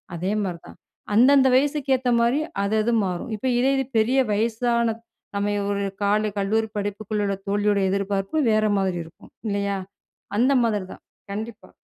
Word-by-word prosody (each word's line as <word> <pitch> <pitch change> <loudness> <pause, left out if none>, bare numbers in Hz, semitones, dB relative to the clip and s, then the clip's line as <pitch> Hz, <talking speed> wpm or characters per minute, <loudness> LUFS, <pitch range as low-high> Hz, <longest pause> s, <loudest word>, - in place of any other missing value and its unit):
அதே 185 +4 -2
மாதிரி 175 -3 -4
தான். - - -13 0.4
அந்தந்த 265 +4 +6
வயசுக்கு 280 +1 +1
ஏத்த 255 -1 -2
மாதிரி 240 +5 +2 0.2
அது 200 +2 0
அது 235 - +1
மாறும். 180 +6 -4
இப்போ 215 +5 -3
இதே 260 - +3
இது 270 - 0
பெரிய 245 +5 +2
வயசான 230 +1 +1 0.4
நம்ம 200 0 0 0.2
ஒரு 200 0 -1 0.2
கால 210 +1 +2
கல்லூரி 220 +3 +1
படிப்புக்குள்ள 205 +1 -2
உள்ள 200 0 0
தோழியோட 205 0 +1
எதிர்பார்ப்பு 195 +6 -1
வேற 215 0 +3
மாதிரி 190 -2 0
இருக்கும் 160 - -16 0.2
இல்லையா? 200 -1 -1 0.6
அந்த 255 +6 +3
மாதிரி 210 -4 0
தான். - - -15 0.3
கண்டிப்பா. 220 +2 -6
210 Hz, 155 wpm, -23 LUFS, 200-235 Hz, 0.6 s, அந்தந்த